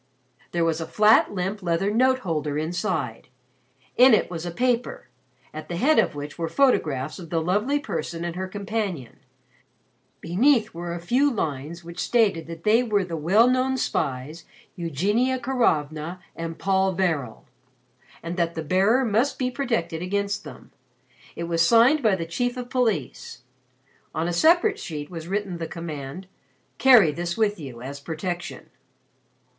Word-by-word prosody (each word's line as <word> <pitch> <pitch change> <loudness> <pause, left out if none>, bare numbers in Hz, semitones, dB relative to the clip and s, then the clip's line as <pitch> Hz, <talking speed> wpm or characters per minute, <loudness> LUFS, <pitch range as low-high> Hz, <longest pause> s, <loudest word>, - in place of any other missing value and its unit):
There 170 -1 +1
was 165 0 0
a 160 - -4
flat 215 +5 +4
limp 195 +2 -3
leather 175 +3 0
note 260 +3 +3
holder 150 -5 -2
inside. 160 - -3 0.7
In 250 -1 +8
it - - -1
was 170 0 -5
a - - -2
paper, 245 +6 -1 0.4
at 155 0 -8
the 175 - -3
head 295 - +3
of - - +1
which 145 +3 -7
were 165 - -1
photographs 155 - +1
of 170 -3 -10
the 165 - 0
Lovely 205 - +1
Person 165 - -4
and 170 -1 -4
her 190 +1 -3
companion. 200 - -4 1.0
Beneath 220 - +2
were 170 0 -5
a - - -5
few 255 +12 +2
lines 160 - -4
which 170 +1 -9
stated 210 -10 +1
that 165 0 -9
they 220 +3 +4
were 210 -5 0
the 170 -2 -5
well 190 +10 +4
known 255 +1 +1
spies, 145 - -2 0.3
Eugenia 200 - 0
Karovna 170 - -1 0.2
and 165 0 -5
Paul 190 -1 +1
Varel, 160 -11 -1 0.8
and 170 +2 -5
that 170 -1 0
the 160 - -3
bearer 195 - +3
must 230 +5 +1
be 255 -1 -1
protected 230 - -2
against 200 +2 -2
them. 145 -5 -12 0.6
It 170 - -4
was 165 0 0
signed 235 - +5
by 215 -5 +3
the 165 -3 -4
Chief 245 +9 -2
of 250 - -3
the 245 - -18
Police. 210 - -2 0.7
On 160 +2 -1
a 175 - -1
separate 345 - +3
sheet 150 -2 -6
was 165 -2 -7
written 195 -2 -3
the 165 - -3
command: 160 +1 -7 0.5
"Carry 245 - +7
this 175 +3 -4
with 210 -3 +1
you 125 -5 -9
as 140 +2 -7
protection." 175 +4 -5
175 Hz, 160 wpm, -24 LUFS, 165-225 Hz, 1.0 s, In